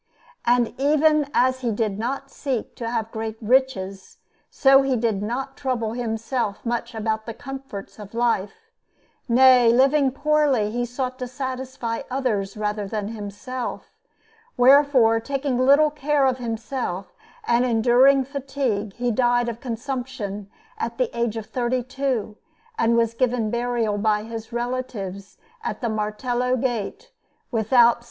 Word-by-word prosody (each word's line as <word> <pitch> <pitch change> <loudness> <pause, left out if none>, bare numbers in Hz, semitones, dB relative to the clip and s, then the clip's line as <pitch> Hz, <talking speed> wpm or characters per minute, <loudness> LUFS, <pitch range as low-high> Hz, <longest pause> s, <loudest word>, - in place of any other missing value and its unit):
And 240 -1 +3
even 300 +1 +3
as 260 0 +2
he 245 -3 -1
did 210 -2 -1
not 270 +4 -3
seek 260 -6 -3
to 230 -1 -3
have 225 -1 -2
great 220 -1 -4
riches, 210 -6 0 0.3
so 270 -1 +5
he 270 -1 +1
did 220 -4 0
not 260 +5 -3
trouble 245 -5 -2
himself 230 -2 -3
much 235 0 -2
about 220 0 -2
the 230 - -5
comforts 270 -7 -8
of 210 +1 -10
life 240 - -1 0.6
nay, 250 -1 +6
living 270 +3 +4
poorly, 280 -6 +2
he 240 +1 -1
sought 255 +1 -4
to 250 - -3
satisfy 255 -2 -4
others 220 -7 -1
rather 210 -1 -2
than 210 0 -3
himself; 225 +4 -6 0.6
wherefore, 255 -3 +5
taking 270 +1 -2
little 285 +4 +5
care 295 -1 +1
of 260 -1 +1
himself 225 -4 -4 0.3
and 240 +1 +2
enduring 250 +3 +4
fatigue, 260 -7 -3
he 245 +2 -1
died 245 +1 +2
of 235 -1 -4
consumption 235 -5 -5 0.3
at 455 - -3
the - - -1
age 235 -1 -1
of 220 - -5
thirty 250 +1 -1
two, 255 -5 -2 0.4
and 235 - +2
was 230 -1 +2
given 235 -3 0
burial 235 -3 0
by 210 0 +1
his 225 +1 -7
relatives 235 -6 -4 0.3
at - - -3
the 235 - -2
Martello 240 +4 -1
Gate 255 - -3 0.4
without 235 +1 +4
S. - - -20
240 Hz, 140 wpm, -23 LUFS, 220-265 Hz, 0.6 s, nay